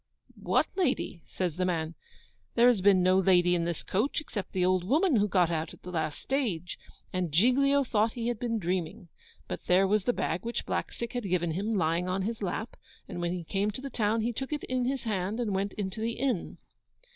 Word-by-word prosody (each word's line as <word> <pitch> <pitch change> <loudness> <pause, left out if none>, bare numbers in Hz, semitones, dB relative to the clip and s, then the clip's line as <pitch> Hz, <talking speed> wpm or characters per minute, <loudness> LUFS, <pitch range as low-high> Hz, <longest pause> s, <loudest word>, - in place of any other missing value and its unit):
'What - - +2
lady?' 270 - 0
says 180 -4 -3
the 185 - +1
man; 165 -3 -1 0.6
'there 240 +1 +7
has 230 -6 +2
been 190 -2 +5
no 185 +1 +5
lady 180 -2 +4
in 170 -1 +1
this 170 -2 -3
coach, 220 +9 0
except 220 -10 -6
the 180 -1 +1
old 185 -1 +2
woman, 295 - +3
who 205 0 +3
got 180 -4 +3
out 160 -1 -2
at - - -27
the 180 - -7
last 160 -3 -2
stage.' 205 - -2 0.3
And 180 -3 -1
Giglio 275 - +4
thought 220 -3 +1
he 235 -1 -3
had 240 -3 -1
been 230 -2 -1
dreaming. 180 -1 -3 0.4
But - - -6
there 185 +2 +5
was 205 0 +1
the 245 - +4
bag 165 -5 -2
which 235 +1 -3
Blackstick 235 -1 -3
had 245 -6 -3
given 175 -2 +1
him 205 +7 -1
lying 170 0 +1
on 190 +1 0
his 225 +2 -3
lap; 215 +4 -3 0.3
and 175 - -5
when 175 0 0
he 180 -1 -4
came 195 +5 0
to 215 +5 -5
the 275 0 -6
town 220 0 +1
he 235 +2 -1
took 265 +5 -5
it 300 - -2
in 255 -1 -1
his 265 0 -1
hand 205 0 -2
and 225 -5 -1
went 195 +1 -1
into 200 +1 -4
the 230 +1 -1
inn. 265 +1 -2
200 Hz, 220 wpm, -29 LUFS, 180-235 Hz, 0.6 s, there